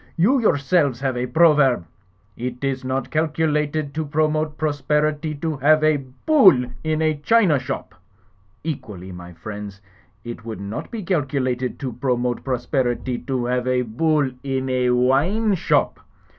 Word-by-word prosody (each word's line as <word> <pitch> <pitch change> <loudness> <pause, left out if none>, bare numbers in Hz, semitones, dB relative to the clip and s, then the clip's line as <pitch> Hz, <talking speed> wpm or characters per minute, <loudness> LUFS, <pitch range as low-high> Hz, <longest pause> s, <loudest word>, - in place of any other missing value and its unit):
"You 225 +11 +3
yourselves 145 - +2
have 135 -2 -1
a 125 +1 -2
proverb, 140 - +4 0.5
'It 125 +2 -5
is 135 -1 -1
not 130 0 -3
calculated 155 -2 0
to 160 +1 -2
pro 155 +1 +1
mote 155 0 -2
prosperity 150 +1 0
to 155 +1 -3
have 155 +3 +4
a 155 -1 +4
Bull 135 - +4 0.2
in 155 0 0
a 155 -1 +1
china 165 -1 +3
shop.' 125 -8 -5 0.7
Equally, 105 - -6
my 90 0 -10
friends, 100 +2 -8 0.4
it 120 -2 -7
would 110 -3 -6
not 100 +2 -6
be 225 -3 -5
calculated 135 -7 -1
to 130 -3 -3
pro 125 -1 0
mote 120 0 -2
prosperity 125 -1 -1
to 130 -3 -2
have 125 0 -1
a 125 0 +2
Bull 140 +4 +1
in 130 -1 -2
a 125 -1 +1
wine 145 - +2
shop. 185 - +1
135 Hz, 150 wpm, -22 LUFS, 125-155 Hz, 0.7 s, proverb